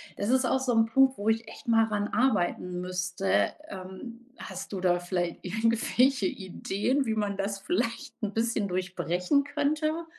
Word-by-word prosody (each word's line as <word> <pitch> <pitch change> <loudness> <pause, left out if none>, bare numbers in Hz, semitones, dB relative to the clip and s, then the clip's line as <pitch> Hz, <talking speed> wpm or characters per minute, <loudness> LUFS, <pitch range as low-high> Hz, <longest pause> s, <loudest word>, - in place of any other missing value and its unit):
das 200 - -2
ist 260 +1 +3
auch 265 - +2
so 260 -1 0
'n 225 -1 +4
Punkt, 265 +3 +4
wo 205 - -4
ich 225 0 +1
echt - - -12
mal 225 -1 +5
ran 210 -2 -1
arbeiten 180 -7 0
müsste. 180 - 0 0.2
Ähm, 190 +5 -8 0.2
hast 190 0 -7
du 195 - -3
da 180 -1 +2
vielleicht 175 -1 -2
irgendwelche 230 +4 +2
Ideen, 205 +9 -1
wie 220 -2 0
man 205 -2 -1
das 200 0 -2
vielleicht 230 +6 -2
'n 205 -1 -1
bisschen 225 -2 0
durchbrechen 180 - 0
könnte? 310 +3 -1
210 Hz, 165 wpm, -28 LUFS, 185-245 Hz, 0.2 s, mal